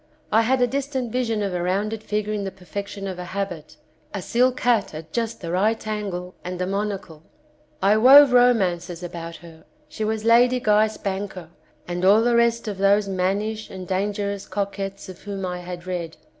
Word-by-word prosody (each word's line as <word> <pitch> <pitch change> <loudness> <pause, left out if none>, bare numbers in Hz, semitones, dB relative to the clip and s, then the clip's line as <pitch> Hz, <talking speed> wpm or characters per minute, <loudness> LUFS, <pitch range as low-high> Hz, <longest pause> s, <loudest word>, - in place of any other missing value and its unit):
I 220 - +5
had 250 +2 +2
a - - +6
distant 265 -2 -3
vision 230 -4 0
of 195 -2 -2
a 175 - -1
rounded 205 +5 -1
figure 210 0 -2
in 205 -1 -2
the 195 - -2
perfection 195 +2 -7
of 185 -2 -5
a - - -4
habit, 175 -6 -4 0.4
a 200 - -3
silk 250 +1 +2
hat 225 -9 +2
at 155 +1 -9
just 230 -1 -2
the 170 -2 -4
right 215 +6 +1
angle 195 -4 -4
and 180 0 -5
a 180 - 0
monocle. 195 -5 -4 0.6
I 205 +2 +5
wove 265 +3 +8
romances 185 -8 +2
about 170 -1 -6
her; 165 -2 -14 0.2
she 260 -7 -5
was 220 0 -2
Lady 245 +2 +5
Guy 215 -1 +4
Spanker 195 -4 -5 0.4
and 175 0 -3
all 205 +4 +6
the 240 0 +3
rest 235 0 +2
of 200 -3 -4
those 200 +1 +3
mannish 200 +4 -1
and 185 -1 -8
dangerous 200 +1 -2
coquettes 195 0 -4
of 185 -1 -11
whom 200 -2 -5
I 180 -1 -4
had 180 0 -8
read. 175 -3 -4
200 Hz, 185 wpm, -23 LUFS, 180-220 Hz, 0.6 s, wove